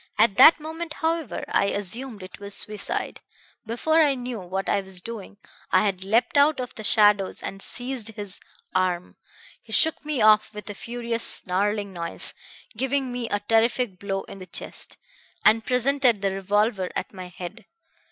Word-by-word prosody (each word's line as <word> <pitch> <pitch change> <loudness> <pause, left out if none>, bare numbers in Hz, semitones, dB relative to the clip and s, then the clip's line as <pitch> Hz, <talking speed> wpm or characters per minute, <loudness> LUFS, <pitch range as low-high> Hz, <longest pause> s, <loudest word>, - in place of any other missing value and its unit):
"At 215 -2 +4
that 325 - +9
moment, 320 +1 -5
however, 320 - -2
I - - +2
assumed 205 +3 -4
it 185 - -11
was 200 0 -1
suicide. 210 -2 -2 0.5
Before 315 +8 +2
I 290 -3 +4
knew 245 -2 -5
what 190 +1 -4
I 200 - +2
was 190 -1 -5
doing 205 0 -8 0.3
I 185 +2 +4
had 190 -2 -1
leapt 230 +8 +2
out 290 0 +4
of 250 -1 -5
the 220 - -9
shadows 205 -2 +3
and 195 - -6
seized 245 -3 +1
his 205 -3 -6 0.3
arm. 180 -1 -1 0.4
He - - -16
shook 320 -1 +2
me 300 -3 -2
off 215 0 +4
with 210 - -8
a - - -6
furious 235 +2 -4
snarling 200 +2 0
noise, 170 -1 -4 0.4
giving 265 +2 -1
me 245 -2 -4
a 205 - -1
terrific 225 -1 +1
blow 195 -1 -3
in 195 - -10
the 185 - -10
chest, - - -5 0.5
and 220 +1 +5
presented 250 -3 +2
the 195 - +2
revolver 195 0 0
at - - -4
my 185 -1 -8
head. 185 +4 -9
215 Hz, 170 wpm, -25 LUFS, 195-250 Hz, 0.5 s, that